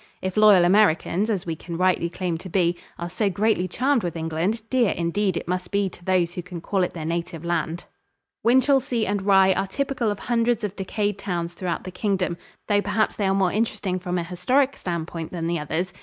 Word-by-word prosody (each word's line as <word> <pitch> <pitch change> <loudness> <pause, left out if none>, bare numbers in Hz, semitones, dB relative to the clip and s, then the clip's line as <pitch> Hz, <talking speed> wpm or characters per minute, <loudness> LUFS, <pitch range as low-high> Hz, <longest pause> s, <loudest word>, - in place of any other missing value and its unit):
If 185 -1 -4
loyal 210 -4 +7
Americans, 195 +1 +3
as 200 -5 -1
we 165 -2 -2
can 170 +1 -7
rightly 180 -2 +2
claim 175 -1 -3
to 185 - -9
be, 175 -1 +2 0.2
are 170 - -4
so 205 +3 0
greatly 200 -1 +1
charmed 260 +6 +1
with 175 -3 -3
England, 165 +7 -1
dear 245 -5 +3
indeed 180 +2 0
it - - -5
must 180 0 -2
be 200 -1 +1
to 175 - -16
those 175 -2 +1
who 180 - -4
can 180 -1 -8
call 190 +3 -1
it 180 - 0
their 160 -3 -5
native 170 0 -3
land. 170 0 -2 0.6
Winchelsea 255 -1 +3
and 205 0 -1
Rye 190 -1 +5
are 195 +1 -1
typical 265 0 -1
of 205 - -2
hundreds 235 -1 +1
of 205 -1 -3
decayed 205 +1 -2
towns 175 -3 -3
throughout 180 -2 -3
the 185 - -7
Kingdom, 185 -2 -1 0.3
though 205 -1 +3
perhaps 205 +2 0
they 200 - 0
are 190 - +2
more 190 -2 +2
interesting 200 -3 -1
from 180 0 -3
an 170 - -2
historic 250 +11 +1
standpoint 165 -2 -4
than 170 -2 -4
the 170 0 0
others. 160 +5 -2
185 Hz, 210 wpm, -24 LUFS, 175-210 Hz, 0.6 s, loyal